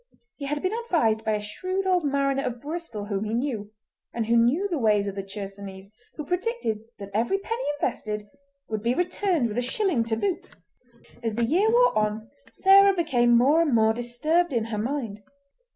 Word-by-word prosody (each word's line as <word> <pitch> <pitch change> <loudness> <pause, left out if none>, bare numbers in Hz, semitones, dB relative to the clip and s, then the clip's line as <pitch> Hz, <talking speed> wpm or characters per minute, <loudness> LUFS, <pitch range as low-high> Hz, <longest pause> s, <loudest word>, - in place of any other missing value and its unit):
He 280 - -5
had 295 +1 -2
been 370 - +1
advised 320 - +1
by 220 - 0
a 210 - 0
shrewd 370 - -3
old 365 -2 +2
mariner 275 -1 +1
of 240 -1 -3
Bristol 290 -8 -5
whom 200 -1 -2
he 215 +1 -2
knew, 235 -5 -2 0.5
and 230 -1 -1
who 230 +2 +2
knew 250 +12 +3
the 340 -6 -2
ways 210 -3 +3
of 200 - -3
the 195 - -4
Chersonese, 195 0 -8 0.2
who 300 - -6
predicted 360 - -2 0.2
that 200 0 -9
every 235 - +1
penny 455 +5 -4 0.2
invested 215 -5 -2 0.4
would 215 -1 -3
be 235 +3 +1
returned 355 -5 0
with 220 +2 -2
a - - +1
shilling 275 - +1
to 225 -1 -1
boot. 360 - -3 0.7
As 225 -3 -2
the 235 0 +1
year 370 - +2
wore - - +4
on 215 +2 -1 0.2
Sarah 395 0 +6
became 245 -9 +3
more 285 +7 +4
and 295 -7 +2
more 220 0 +4
disturbed 265 +9 0
in 235 -4 0
her 220 -2 -4
mind. 230 -4 -3
240 Hz, 190 wpm, -25 LUFS, 215-345 Hz, 0.7 s, Sarah